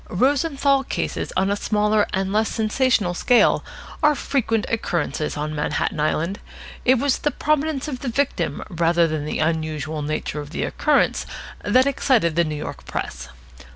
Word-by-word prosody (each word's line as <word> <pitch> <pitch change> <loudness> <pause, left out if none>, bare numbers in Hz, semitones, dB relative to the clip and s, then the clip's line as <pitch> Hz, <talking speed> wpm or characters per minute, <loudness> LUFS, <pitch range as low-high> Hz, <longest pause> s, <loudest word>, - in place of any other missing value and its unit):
Rosenthal 275 - +2
cases - - -3
on 190 +1 +2
a - - +2
smaller 210 0 +1
and 190 +1 -1
less 215 +1 +2
sensational 220 -4 +1
scale 245 +7 +3 0.4
are 300 -1 +4
frequent 225 -6 0
occurrences 170 -8 -2
on 150 +1 -3
Manhattan 150 +1 -1
Island. 165 +5 0 0.5
It 260 +1 +5
was 275 +1 +1
the 295 - +1
prominence 305 -1 0
of 260 -4 -4
the 260 - -3
victim 280 +4 -1
rather 170 -2 +2
than 155 -2 -3
the 155 - -3
unusual 155 -1 -1
nature 150 0 -3
of 145 - -9
the 160 - -3
occurrence 300 -2 +1 0.4
that 255 +1 +4
excited 250 - +2
the 170 - +4
New 155 -2 -3
York 145 - -7
press. 60 0 -5
205 Hz, 155 wpm, -22 LUFS, 155-265 Hz, 0.5 s, It